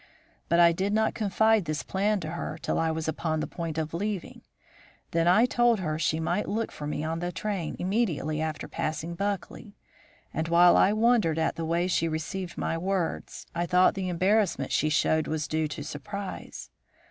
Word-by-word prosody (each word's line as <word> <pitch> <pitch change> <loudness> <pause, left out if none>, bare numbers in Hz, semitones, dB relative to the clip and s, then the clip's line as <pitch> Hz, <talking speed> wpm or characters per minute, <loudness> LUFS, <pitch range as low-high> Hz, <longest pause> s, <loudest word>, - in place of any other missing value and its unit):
But 170 - +3
I 170 -1 +7
did 190 +4 -1
not 220 0 +2
confide 220 -1 +2
this 155 -1 -2
plan 205 +2 0
to 155 -1 -5
her 170 -2 -4
till - - -1
I 165 - +1
was 160 0 -2
upon 160 0 -1
the - - -1
point 165 -2 -5
of 160 0 -2
leaving. 200 +1 -4 0.7
Then 165 0 +2
I 210 +7 +6
told 240 -3 +3
her 155 -4 -2
she 160 0 +1
might 165 +6 -1
look 225 +2 -1
for 150 - -6
me 150 0 -3
on 165 +1 -2
the 175 +1 -3
train 190 -5 -3
immediately 180 - -1
after 155 -1 -3
passing 155 +2 -3
Buckley, 200 +2 -4 0.6
and 160 +1 -2
while 175 +1 +6
I 195 - +5
wondered 215 -7 +3
at 160 0 0
the 165 -1 -3
way 170 +2 +1
she 175 -2 +1
received 170 +3 -4
my 165 - -1
words, 185 -1 -2
I 175 +1 -1
thought 180 +2 +4
the 190 -1 -3
embarrassment 190 +3 +1
she 155 - +2
showed 155 +1 +2
was 155 0 -2
due 155 0 0
to 150 -1 -6
surprise. 185 +7 -7
170 Hz, 190 wpm, -27 LUFS, 160-200 Hz, 0.7 s, I